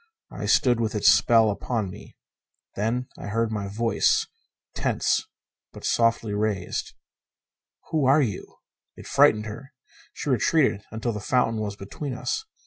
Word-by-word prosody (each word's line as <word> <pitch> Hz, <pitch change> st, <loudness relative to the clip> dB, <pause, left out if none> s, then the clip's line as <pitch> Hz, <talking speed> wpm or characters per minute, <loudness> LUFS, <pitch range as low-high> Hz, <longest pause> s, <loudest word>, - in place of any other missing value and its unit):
I -, -, -5 dB
stood 120 Hz, -3 st, +3 dB
with 110 Hz, -1 st, -1 dB
its 105 Hz, -, +5 dB
spell 115 Hz, -2 st, +5 dB
upon 105 Hz, -1 st, -3 dB
me. 105 Hz, +2 st, -13 dB, 0.6 s
Then 115 Hz, +5 st, -1 dB
I -, -, -7 dB
heard 115 Hz, +1 st, 0 dB
my 105 Hz, -2 st, -3 dB
voice, 115 Hz, +3 st, +1 dB, 0.5 s
tense -, -, 0 dB, 0.5 s
but -, -, -9 dB
softly 115 Hz, -2 st, +1 dB
raised. 105 Hz, -3 st, -2 dB, 1.0 s
"Who 155 Hz, -4 st, +1 dB
are 140 Hz, +3 st, +5 dB
you?" 105 Hz, -7 st, -5 dB, 0.4 s
It -, -, -12 dB
frightened 105 Hz, 0 st, +4 dB
her. 130 Hz, +7 st, -9 dB, 0.4 s
She 145 Hz, -, -3 dB
retreated 125 Hz, -4 st, +2 dB
until 110 Hz, +2 st, -3 dB
the 105 Hz, -, -4 dB
fountain 115 Hz, +1 st, +1 dB
was 100 Hz, -2 st, -4 dB
between 125 Hz, +7 st, -6 dB
us. 440 Hz, -, -3 dB
115 Hz, 140 wpm, -25 LUFS, 105-125 Hz, 1.0 s, its